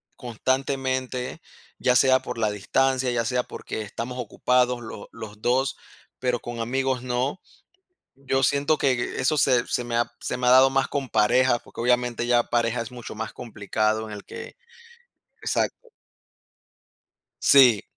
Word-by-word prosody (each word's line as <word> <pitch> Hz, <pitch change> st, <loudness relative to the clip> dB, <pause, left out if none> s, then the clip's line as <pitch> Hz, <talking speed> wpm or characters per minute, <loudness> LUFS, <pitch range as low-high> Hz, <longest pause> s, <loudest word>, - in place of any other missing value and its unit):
constantemente, 130 Hz, +1 st, -2 dB, 0.4 s
ya 125 Hz, -, +2 dB
sea 130 Hz, +1 st, +5 dB
por 125 Hz, -1 st, -6 dB
la 110 Hz, -2 st, +1 dB
distancia, 130 Hz, +5 st, +1 dB
ya 115 Hz, -1 st, 0 dB
sea 125 Hz, +2 st, +1 dB
porque 110 Hz, -, -7 dB
estamos 120 Hz, +4 st, -6 dB
ocupados 125 Hz, +1 st, +1 dB
los 110 Hz, -3 st, -9 dB
los 105 Hz, -2 st, -10 dB
2, 130 Hz, +3 st, +1 dB, 0.4 s
pero 125 Hz, -2 st, 0 dB
con 120 Hz, -1 st, -7 dB
amigos 130 Hz, +2 st, -1 dB
no. 125 Hz, +7 st, -2 dB, 0.7 s
Yo 135 Hz, 0 st, -1 dB
siento 140 Hz, +4 st, +2 dB
que 135 Hz, -, +2 dB
e 120 Hz, -, -3 dB
e -, -, -1 dB
eso 140 Hz, +4 st, +2 dB
se 130 Hz, -4 st, +3 dB
se 125 Hz, -, -1 dB
me 120 Hz, -1 st, -2 dB
ha 120 Hz, -, +1 dB
se -, -, -3 dB
me 125 Hz, 0 st, -1 dB
ha -, -, +6 dB
dado 130 Hz, +1 st, +7 dB
más 135 Hz, 0 st, +1 dB
con 135 Hz, -4 st, -3 dB
pareja, 120 Hz, +3 st, +3 dB
porque -, -, -10 dB
obviamente 125 Hz, 0 st, +1 dB
ya 120 Hz, -1 st, +3 dB
pareja 120 Hz, 0 st, 0 dB
es 115 Hz, +1 st, -7 dB
mucho 120 Hz, -2 st, -8 dB
más 110 Hz, +1 st, -6 dB
complicado 110 Hz, 0 st, -2 dB
en 105 Hz, -, -8 dB
el 105 Hz, -, -8 dB
que 470 Hz, +1 st, -9 dB, 0.9 s
exacto. -, -, -2 dB, 1.5 s
Sí. 125 Hz, -7 st, +6 dB
125 Hz, 160 wpm, -25 LUFS, 115-130 Hz, 1.5 s, dado